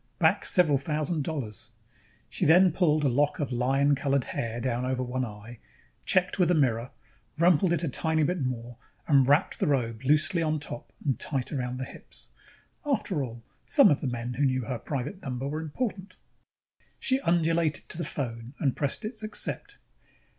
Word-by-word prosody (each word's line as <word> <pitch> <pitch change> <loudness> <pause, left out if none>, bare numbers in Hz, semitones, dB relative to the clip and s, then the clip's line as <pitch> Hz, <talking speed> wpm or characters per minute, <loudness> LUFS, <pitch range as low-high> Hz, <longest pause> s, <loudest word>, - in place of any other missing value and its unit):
back - - +2
several 155 -7 +3
thousand 155 +2 -1
dollars. 135 - -5 0.7
Then 175 +4 +6
she - - -15
pulled 155 -4 +2
a - - +3
lock 145 +3 +1
of 145 -4 -2
lion 135 +4 +2
colored 140 -1 +1
hair 115 0 -4
down 120 0 -1
over 130 0 -1
one 130 +1 -2
eye, 110 +1 -8 0.5
checked 185 +1 +2
with 180 - +4
a 180 - +4
mirror, 125 -5 +1 0.5
rumpled 170 +1 +4
it 170 -2 +1
a - - 0
tiny 160 +3 +1
bit 175 +2 0
more 120 -2 -4 0.3
and 140 -4 +5
wrapped 145 +2 +2
the - - +1
robe 120 -6 0
loosely 155 +5 +3
on 155 -1 0
top 145 -4 -8
and 135 -3 0
tight 135 -4 -3
around 125 -3 -3
the 130 - -3
hips. - - -10 0.5
After 210 - 0
all, 115 -2 -8 0.2
some 280 - +6
of 145 - +1
the 140 - -2
men 120 0 -3
who 140 +4 +1
knew 130 -1 +1
her 120 0 -4
private 140 - -4
number 135 -3 -4
were 155 +2 -3
important. 195 - -4 0.8
She 260 0 +2
undulated 165 - +1
to 170 - -1
the - - -1
phone 120 -3 -5
and 140 -6 0
pressed 145 - -2
its 220 0 -5
Accept. 215 0 -2
145 Hz, 180 wpm, -28 LUFS, 125-165 Hz, 0.8 s, Then